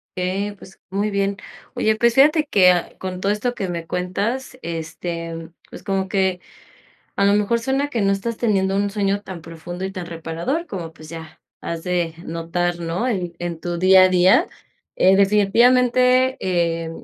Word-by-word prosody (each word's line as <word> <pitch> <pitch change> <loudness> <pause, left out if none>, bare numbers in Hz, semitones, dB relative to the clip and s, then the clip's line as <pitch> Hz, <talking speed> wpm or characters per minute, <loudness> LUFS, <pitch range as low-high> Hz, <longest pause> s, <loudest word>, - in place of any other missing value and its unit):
Okey, 195 +3 -2
pues, 190 - -15
muy 200 +2 0
bien, 200 -1 -1 0.4
oye, 220 0 +1
pues 235 +2 +3
fíjate 300 +4 +5
que, 180 - +3
con 185 -1 -5
todo 195 +2 0
esto 240 +4 -2
que 195 - -3
me 170 -2 -5
cuentas, 210 +10 -3
este, 165 0 -5 0.2
pues - - -10
como 195 -1 -1
que 190 -1 0 0.8
a - - +1
lo 200 - +4
mejor 210 +3 +1
suena 270 +4 -1
que 235 -6 -2
no 195 0 +2
estás 220 +4 -2
teniendo 195 -4 +1
un 200 +1 +1
sueño 200 0 -1
tan 190 -4 -9
profundo 170 +3 -7
y 190 - -4
tan 185 -3 -6
reparador 170 - -3
como, 180 - -6
pues 155 -1 -14
ya, 160 -1 -10 0.2
has 165 -1 -5
de 175 -2 -1
notar, 170 +1 -2
¿no?, 170 +8 -2
en 180 -8 -2
en 170 -2 -5
tu 175 -1 -3
día 185 +1 +6
a - - +3
día, 185 - +4 0.5
eh, 190 +1 +5
definitivamente, 250 +6 +4
eh, 170 -2 -1
190 Hz, 175 wpm, -21 LUFS, 175-210 Hz, 0.8 s, día